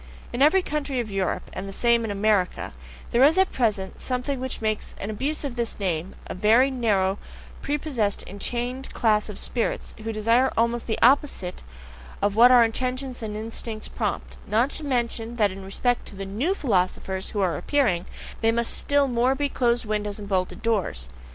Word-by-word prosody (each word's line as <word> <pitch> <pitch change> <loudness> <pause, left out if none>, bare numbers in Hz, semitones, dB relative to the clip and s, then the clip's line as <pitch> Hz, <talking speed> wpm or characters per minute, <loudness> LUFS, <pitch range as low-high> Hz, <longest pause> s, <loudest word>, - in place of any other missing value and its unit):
In 240 - -2
every 360 +6 +5
country 285 -5 -2
of 225 -3 -3
Europe, 195 -2 -2
and 195 +1 -5
the - - -6
same 235 +3 +3
in 225 - -3
America, 200 -2 0 0.4
there 240 +2 +4
is 310 +6 +5
at 380 0 +4
present 205 -6 -1
something 255 +1 -2
which 260 0 -4
makes 215 -1 -2
an 200 - -4
abuse 275 +9 -2
of 275 -4 -4
this 235 -2 -2
name 180 -2 -2
a - - -5
very 230 +8 +4
narrow, 205 -6 +1 0.4
prepossessed, 275 -8 -1
enchained 245 +6 -3
class 215 -2 +2
of 210 - -7
spirits, 235 - -2
who 225 +1 -3
desire 230 +4 +3
almost 235 +1 +1
the 220 - -1
opposite 255 -8 +2 0.6
of 205 0 0
what 240 +3 +8
our 245 -2 +8
intentions 255 +2 -2
and 210 -1 -4
instincts 220 0 -5
prompt - - -3
not 230 +6 +2
to 315 - -2
mention 240 -3 -1
that 210 -4 +2
in 190 +1 -8
respect 245 +5 -1
to - - -9
the 195 0 -5
NEW 245 - -1
philosophers 190 - 0
who 205 - -2
are 185 -3 +1
appearing, 235 -12 +1 0.3
they 225 0 +4
must 235 0 0
still 285 -1 +2
more 250 +1 +2
be 285 +1 -1
closed 240 -2 +1
windows 210 -1 -2
and 205 -1 -8
bolted 185 +1 -1
doors. 190 - -1
230 Hz, 185 wpm, -25 LUFS, 205-255 Hz, 0.6 s, what